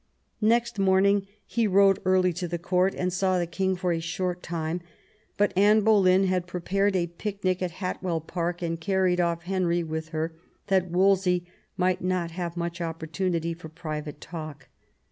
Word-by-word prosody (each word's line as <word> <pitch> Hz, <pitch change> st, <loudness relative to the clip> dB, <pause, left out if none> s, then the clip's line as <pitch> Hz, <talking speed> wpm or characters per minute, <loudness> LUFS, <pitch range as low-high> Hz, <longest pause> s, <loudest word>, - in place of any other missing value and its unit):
Next 235 Hz, 0 st, +2 dB
morning 195 Hz, +1 st, +3 dB, 0.2 s
he 230 Hz, -1 st, 0 dB
rode 195 Hz, 0 st, +5 dB
early 185 Hz, -1 st, +3 dB
to 175 Hz, +1 st, -3 dB
the 175 Hz, +1 st, -3 dB
Court, 180 Hz, +2 st, +1 dB
and 180 Hz, -1 st, -1 dB
saw 185 Hz, 0 st, +1 dB
the 175 Hz, -, 0 dB
king 190 Hz, +2 st, -1 dB
for 180 Hz, -1 st, -1 dB
a 165 Hz, -, -1 dB
short 180 Hz, +2 st, -3 dB
time; 165 Hz, 0 st, -3 dB, 0.6 s
but 205 Hz, 0 st, +2 dB
Anne 210 Hz, +3 st, +5 dB
Bolejm 195 Hz, -3 st, +5 dB
had 185 Hz, -1 st, 0 dB
prepared 195 Hz, +3 st, 0 dB
a 175 Hz, -2 st, +2 dB
picnic 185 Hz, +1 st, -3 dB
at 180 Hz, -, 0 dB
Hatwell 180 Hz, -1 st, -3 dB
Park, 175 Hz, +2 st, -3 dB
and 165 Hz, -1 st, -2 dB
carried 185 Hz, 0 st, +2 dB
off 170 Hz, -1 st, 0 dB
Henry 175 Hz, -2 st, 0 dB
with 160 Hz, 0 st, -4 dB
her, 160 Hz, +1 st, -2 dB, 0.4 s
that 190 Hz, -2 st, +2 dB
Wolsey 180 Hz, 0 st, +3 dB, 0.3 s
might 185 Hz, 0 st, +1 dB
not 180 Hz, -2 st, -1 dB
have 175 Hz, 0 st, -4 dB
much 170 Hz, 0 st, -3 dB
opportunity 165 Hz, +1 st, -2 dB
for 165 Hz, -1 st, -10 dB
private 155 Hz, -2 st, -6 dB
talk. 155 Hz, -4 st, -8 dB
180 Hz, 165 wpm, -26 LUFS, 170-190 Hz, 0.6 s, rode